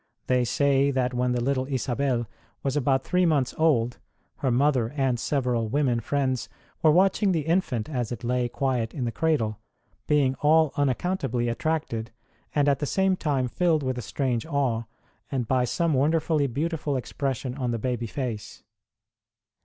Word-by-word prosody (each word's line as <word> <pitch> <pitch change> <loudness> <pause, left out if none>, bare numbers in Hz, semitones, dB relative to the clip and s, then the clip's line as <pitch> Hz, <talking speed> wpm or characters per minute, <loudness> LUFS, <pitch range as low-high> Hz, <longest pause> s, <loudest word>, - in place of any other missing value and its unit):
They 125 -1 +2
say 140 +2 +2
that 130 -2 0
when 125 0 +1
the 120 -1 -1
little 130 0 0
Isabel 130 -2 -1 0.4
was 135 0 -1
about 135 -2 +2
three 180 -1 +2
months 145 -6 +1
old 125 -7 +2 0.4
her 135 - 0
mother 125 -2 +2
and 130 -3 +1
several 125 -4 0
women 125 -1 +1
friends 130 +1 -1 0.3
were 160 - +5
watching 190 +4 +3
the 165 - +1
infant 160 - 0
as 125 -6 -3
it 120 - -5
lay 125 0 0
quiet 125 -4 -1
in 130 -5 -2
the 120 - -1
cradle, 115 -9 0 0.5
being 145 -3 +3
all 155 0 +4
unaccountably 135 -3 0
attracted, 115 -4 -2 0.5
and 145 -1 +3
at 140 -1 +3
the 145 - -2
same 190 +3 +2
time 140 -7 0
filled 160 +2 +1
with 130 -1 -1
a 125 - -4
strange 125 -1 -1
awe, 130 -7 0 0.6
by 130 0 +2
some 165 +6 0
wonderfully 150 +1 +2
beautiful 145 +2 -2
ex 125 - -7
pression 135 -2 -2
on 130 -2 -2
the 120 - -1
baby 120 0 -2
face. 115 -4 -5
135 Hz, 160 wpm, -26 LUFS, 125-150 Hz, 0.6 s, were